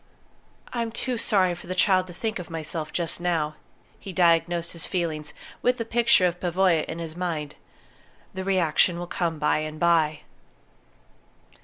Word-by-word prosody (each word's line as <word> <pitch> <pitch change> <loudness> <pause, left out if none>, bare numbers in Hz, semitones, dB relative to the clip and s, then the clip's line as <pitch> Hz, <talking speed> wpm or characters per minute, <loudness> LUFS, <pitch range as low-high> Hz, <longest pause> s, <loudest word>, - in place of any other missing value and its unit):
"I'm 230 -2 -1
too 245 +1 -3
sorry 190 -5 +2
for 175 - -10
the 185 - -3
child 185 -1 +3
to 175 - -9
think 220 -1 -2
of 180 - -8
myself 160 -1 -4
just 170 0 -2
now," 165 -4 0 0.5
he 195 - -8
diagnosed 170 -1 +2
his 170 - -7
feelings, 160 -4 -2 0.3
with 250 0 +2
the 230 - -3
picture 230 -5 +4
of 175 0 0
Pavoya 180 -2 +2
in 160 - -6
his 165 -1 -6
mind. 160 -5 -3 0.8
"The 190 0 -4
reaction 180 -2 +2
will 175 - -4
come 170 -2 -2
by 150 0 +2
and 155 0 -5
by." 160 -3 +3
175 Hz, 160 wpm, -25 LUFS, 160-185 Hz, 0.8 s, picture